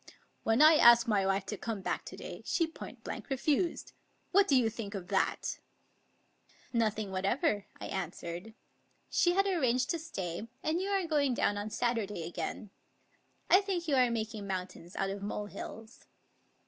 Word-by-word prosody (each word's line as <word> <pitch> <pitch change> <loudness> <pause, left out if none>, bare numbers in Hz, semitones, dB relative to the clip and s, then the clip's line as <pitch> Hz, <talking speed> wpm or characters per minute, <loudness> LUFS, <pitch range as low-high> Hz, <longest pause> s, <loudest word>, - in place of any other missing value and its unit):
" - - -37
When 225 +6 +4
I 310 0 +8
asked 235 -3 +7
my 200 -3 +2
wife 195 0 +1
to 210 - -4
come 220 -2 -4
back - - -2
to - - -8
day, - - -8
she 335 - +1
point 320 - -10
blank - - -6
refused. 290 +5 0 0.4
What 395 +1 +5
do 280 - +4
you 250 -3 +4
think 225 -2 -5
of 180 -2 -6
that? - - 0 0.3
" - - -41 0.2
" - - -42 0.3
Nothing 215 -3 0
whatever," 205 - 0
I - - -6
answered. 180 +2 -5 0.3
" - - -41
She 350 -1 +3
had 390 +2 +3
arranged 260 -10 +2
to 335 - -1
stay, 195 - -5 0.2
and 320 +3 0
you 390 - -2
are 390 -2 +1
going 290 -5 +2
down 205 - +1
on 205 +1 -3
Saturday 215 -6 -1
again. 175 +5 -5 0.8
I 375 - +7
think 370 -4 -2
you 295 - +1
are 255 -2 +5
making 220 -3 -3
mountains 185 -2 -5
out 195 0 -1
of 200 0 -5
molehills." 210 +2 -7
225 Hz, 180 wpm, -32 LUFS, 200-305 Hz, 0.8 s, I